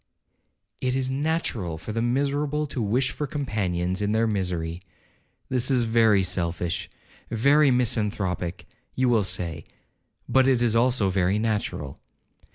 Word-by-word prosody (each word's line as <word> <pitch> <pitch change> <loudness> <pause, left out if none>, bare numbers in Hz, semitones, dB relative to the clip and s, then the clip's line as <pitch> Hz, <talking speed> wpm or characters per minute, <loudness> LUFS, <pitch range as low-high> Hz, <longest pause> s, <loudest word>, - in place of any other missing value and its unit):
'It 130 0 -1
is 130 -1 -1
natural 135 - -2
for 110 - -7
the 115 +1 -1
miserable 145 +4 0
to 140 -4 -4
wish 125 +5 +1
for 150 - -4
companions 95 - -2
in 105 +1 0
their 110 +1 +2
misery. 90 -5 -2 0.7
This 130 0 0
is 125 -3 +3
very 110 -3 +4
selfish, 90 -2 -2 0.4
very 140 +6 +4
misanthropic, 100 -7 0 0.3
you 130 -1 +2
will 115 -4 +3
say, 85 -4 -3 0.6
but 130 0 +4
it 130 -3 +3
is 120 -2 +2
also 115 -4 +2
very 95 +1 +1
natural. 105 -10 -2
110 Hz, 135 wpm, -25 LUFS, 95-130 Hz, 0.7 s, very